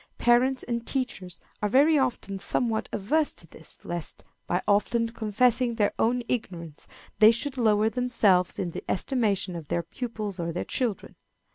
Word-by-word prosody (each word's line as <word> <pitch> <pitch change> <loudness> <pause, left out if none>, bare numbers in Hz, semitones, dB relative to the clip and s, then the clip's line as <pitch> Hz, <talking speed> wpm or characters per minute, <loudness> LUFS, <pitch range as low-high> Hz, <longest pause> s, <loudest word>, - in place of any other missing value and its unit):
Parents 250 +2 +3
and 235 -1 -3
teachers 190 -10 -3 0.2
are 210 - +1
very 285 +7 +5
often 245 -8 -1
somewhat 225 +2 -1
averse 295 +10 +1
to - - -7
this, - - -10
lest, 170 -2 -4 0.2
by 180 +1 0
often 230 +3 +2
confessing 235 +2 +1
their 210 -3 +1
own 245 +2 +2
ignorance, 170 -10 -4 0.3
they 215 0 +9
should 250 +4 -1
lower 215 -3 +3
themselves 225 -7 +2
in 180 -3 -2
the - - -6
estimation 200 -5 0
of 165 -3 -7
their 170 - -1
pupils 215 -5 -5
or 170 0 -2
their 175 - -3
children. 235 -6 -2
225 Hz, 155 wpm, -27 LUFS, 195-250 Hz, 0.3 s, they